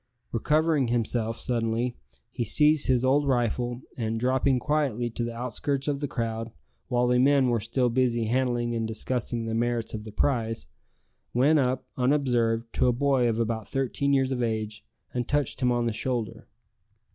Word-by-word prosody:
Recovering 150 +3 +2
himself 115 -1 -1
suddenly, 120 0 -1 0.4
he 120 - -2
seized 150 +6 +3
his 130 -1 +2
old 140 +2 +3
rifle, 120 -1 0
and 115 -2 -2
dropping 130 +2 +2
quietly 125 -4 0
to 120 - -2
the 115 0 -4
outskirts 130 +4 -2
of 145 -1 0
the 145 - -2
crowd, 115 -2 -3 0.4
while 125 0 +1
the 125 0 +3
men 135 0 +4
were 120 -1 +2
still 115 +4 0
busy 120 -1 +1
handling 120 0 0
and 115 -1 -1
discussing 115 +1 -2
the 115 - -3
merits 120 0 -1
of 105 -1 -5
the 110 - -9
prize, 115 - 0 0.7
went 145 +5 +4
up, 130 -1 0
unobserved, 125 -4 +1
to - - +2
a - - +5
boy 130 -1 +2
of 110 - -1
about 115 -2 -2
thirteen 135 +1 -1
years 135 -1 +2
of 125 -2 -1
age, 110 -2 -2 0.3
and 125 -1 -2
touched 145 -3 -1
him 125 -1 +3
on 120 -1 +1
the 115 - 0
shoulder. 120 0 -3
120 Hz, 170 wpm, -27 LUFS, 115-130 Hz, 0.7 s, a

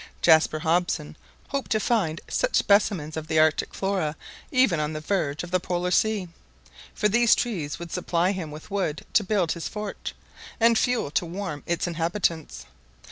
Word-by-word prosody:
Jaspar 160 -1 +5
Hobson 165 -2 0 0.3
hoped 275 -1 -3
to 215 - +2
find 195 -8 0
such - - 0
specimens 195 -7 +2
of 160 -1 -5
the 160 0 0
Arctic 155 0 +2
Flora 190 -6 -1 0.4
even 255 - +3
on 150 +1 -1
the 155 - -4
verge 155 -3 -1
of 175 - -8
the 185 - +2
Polar 180 0 -2
Sea; 210 -1 +2 0.7
for 210 - +2
these 235 +2 +5
trees 175 - -2
would 170 -1 -8
supply 180 0 +1
him 185 -5 -4
with 155 +6 -11
wood 185 -7 -2
to 220 - +4
build 190 -4 +1
his 170 - -3
fort, 210 -2 -5 0.5
and 230 0 +5
fuel 240 -9 +1
to 175 - 0
warm 175 -4 -5
its 170 0 0
inhabitants. 165 - -2
175 Hz, 170 wpm, -25 LUFS, 160-205 Hz, 0.7 s, Jaspar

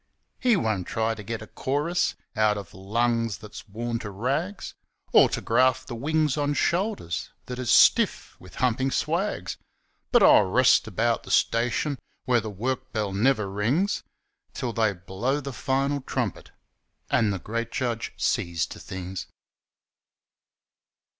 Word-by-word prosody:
He 245 -3 +4
won't 110 - -1
try 110 0 0
to 110 - -8
get 110 +2 -5
a - - -8
chorus 150 +6 -1 0.2
Out 105 -1 +3
of 100 - -8
lungs 115 +2 0
that's 105 +3 -11
worn 115 +3 -3
to 110 - -6
rags, 140 - -2 0.4
Or - - +7
to - - -3
graft 130 +2 +2
the - - -6
wings 150 +4 0
on 145 0 0
shoulders 175 - -1 0.2
That 125 0 -6
is 125 -2 -3
stiff - - +4
with 90 -1 -14
humpin' 130 +1 +1
swags. 165 +9 -1 0.5
But 240 -4 +5
I'll 105 - +7
rest 125 +5 +4
about 115 +3 0
the - - -13
station 125 +4 +1 0.3
Where 125 -3 +3
the 110 - -5
work 130 +6 -3
bell 105 -4 -2
never 110 0 +2
rings, 120 - 0 0.5
Till 120 -2 -3
they 110 -3 +2
blow 95 +10 -2
the 140 -1 -6
final 135 +2 0
trumpet - - -3 0.6
And 110 -3 +3
the 95 - -2
Great 115 +5 -4
Judge 120 -3 -2
sees 85 -3 0
to - - -12
things. 95 0 -6
120 Hz, 145 wpm, -26 LUFS, 105-135 Hz, 0.6 s, Or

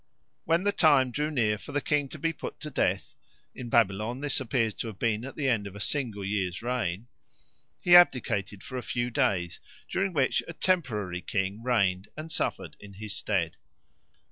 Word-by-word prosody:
When 165 +3 +2
the 205 - +3
time 145 -9 +4
drew 150 +5 -1
near 110 -8 +1
for 145 - -10
the 145 - +2
king 145 0 0
to 155 - -7
be 165 +2 -1
put - - -7
to 150 - -6
death - - 0 0.4
(in 125 -2 -7
Babylon 110 +2 +2
this 145 -1 0
appears 115 -3 0
to 115 - -5
have 110 -4 -7
been 110 0 0
at 135 - -7
the 145 -3 -1
end 110 -6 +1
of 100 - -10
a - - -8
single 110 -4 -2
year's 95 -2 -2
reign) 120 -5 -2 0.7
he 175 0 +6
abdicated 110 - +4
for 130 - -5
a - - -5
few 120 0 -2
days, 100 - 0 0.3
during 195 0 0
which 140 -6 +2
a 170 - -6
temporary 110 - 0
king 100 +3 -2
reigned 100 -6 +1
and 155 +1 -6
suffered - - -2
in 100 -1 -12
his 105 +1 -6
stead. 90 -6 -1
120 Hz, 190 wpm, -28 LUFS, 100-145 Hz, 0.7 s, he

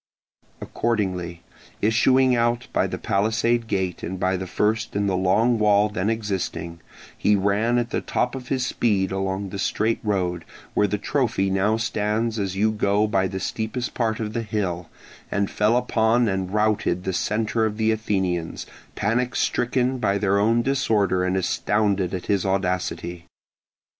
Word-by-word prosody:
Accordingly 90 -7 -2 0.4
issuing 130 +4 +4
out 120 0 0
by - - +2
the - - -4
palisade 115 +3 +1
gate 95 -4 -2
and 95 +2 -5
by 95 +1 +1
the 95 0 -4
first 110 +4 0
in 100 0 +1
the 95 -2 +1
long 110 +6 +2
wall 105 0 +4
then 105 -1 -1
existing, 95 -6 -3 0.4
he 105 - +2
ran 100 +5 +1
at 120 0 -1
the - - -1
top 125 - -1
of 130 -2 -7
his 130 -1 0
speed 100 -7 0
along 95 +1 -2
the 100 - -6
straight 110 +3 0
road, 90 -5 -1 0.3
where 105 - +3
the 105 - -1
trophy 110 -4 0
now 100 +3 +2
stands 110 0 -1
as 95 -2 -2
you 110 +3 +2
go 105 -1 +1
by 95 -3 +1
the 95 0 -4
steepest 110 +5 -3
part 110 -2 -1
of 110 -1 -3
the 115 - -1
hill, 95 -6 -3 0.4
and 100 -1 -1
fell 110 +3 +2
upon 120 -1 +2
and 95 -2 -2
routed 105 -4 +1
the 95 - -2
centre 110 +4 0
of 105 -1 -5
the 110 0 +2
Athenians, 95 -6 -2 0.3
panic 120 +4 0
stricken 125 +1 0
by 100 -4 +1
their 100 0 +2
own 115 +3 +3
disorder 105 -9 +1
and 95 +1 0
astounded 100 0 0
at 90 -2 -4
his 100 -3 +1
audacity. 90 -2 -2
105 Hz, 165 wpm, -23 LUFS, 95-115 Hz, 0.4 s, issuing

